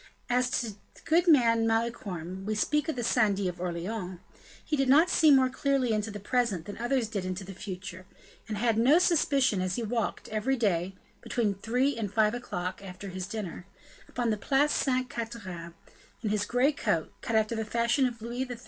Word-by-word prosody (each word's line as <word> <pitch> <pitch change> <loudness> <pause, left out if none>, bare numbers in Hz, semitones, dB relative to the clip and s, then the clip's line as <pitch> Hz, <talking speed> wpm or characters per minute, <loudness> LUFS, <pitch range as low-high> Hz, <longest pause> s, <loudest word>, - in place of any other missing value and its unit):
As 250 +1 +2
to 230 -3 -4 0.2
the - - -17
good 340 +3 +3
man, 230 -7 +5
Malicorne 195 -6 -2
we 215 - 0
speak 300 +8 +1
of 315 - -1
the 240 - -3
syndic 205 -4 +2
of 180 -1 -3
Orleans 180 +2 -4 0.5
he 305 - 0
did 270 -2 +1
not 315 +6 +6
see 315 - +5
more 265 -2 +6
clearly 260 -2 0
into 215 +1 -1
the 205 0 -6
present 210 -5 0
than 205 - -8
others 240 0 0
did 205 -4 -3
into 185 +1 -4
the 195 +1 -8
future; 185 -1 -8 0.4
and 215 - -3
had 225 0 +1
no 265 +7 +6
suspicion 280 - +3
as 185 0 -1
he 235 - -2
walked, 230 0 -2
every 220 +5 0
day, 190 -4 0 0.3
between 220 -4 0
three 250 +8 0
and 205 -4 -3
five 215 0 +3
o'clock, 185 -6 -4
after 190 +1 -8
his 185 0 -5
dinner, 195 -4 -6 0.4
upon 240 -2 -1
the 215 - 0
Place 280 +7 +2
Sainte 255 -1 +1
Catherine, 195 -9 -6 0.5
in 210 - 0
his 210 -1 0
gray 250 +4 +3
coat, 170 - -1
cut 230 - -2
after 220 +1 +2
the 220 - -1
fashion 235 +4 +2
of 235 -3 -8
Louis 240 +2 -3
XIII. 245 -2 -7
225 Hz, 195 wpm, -29 LUFS, 195-250 Hz, 0.5 s, not